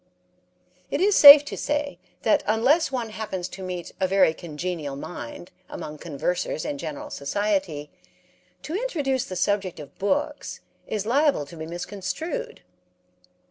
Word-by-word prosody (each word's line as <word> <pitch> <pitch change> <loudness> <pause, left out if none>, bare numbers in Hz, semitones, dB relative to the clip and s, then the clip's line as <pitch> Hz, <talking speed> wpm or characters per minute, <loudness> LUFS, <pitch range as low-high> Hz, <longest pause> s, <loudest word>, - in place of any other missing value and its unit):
It - - -1
is 400 +1 +3
safe 285 0 +11
to - - -5
say 295 -1 -2 0.2
that - - +3
unless 260 +10 +3
one 240 -4 -2
happens 190 -5 -4
to 195 - -9
meet 180 -2 -5
a 190 - +2
very 190 -3 +4
congenial 160 -3 -5
mind 155 +1 -8 0.2
among 150 0 -7
conversers 170 +2 -2
in 140 - -3
general 155 -1 -6
society, 175 -1 -2 0.7
to 300 - -6
introduce 300 - -1
the 185 - -7
subject 190 -1 0
of 145 -2 -11
books 290 +9 -2 0.3
is 210 -2 -2
liable 275 - +2
to 155 - -12
be 160 0 -7
misconstrued. 260 - -5
195 Hz, 140 wpm, -25 LUFS, -, 0.7 s, safe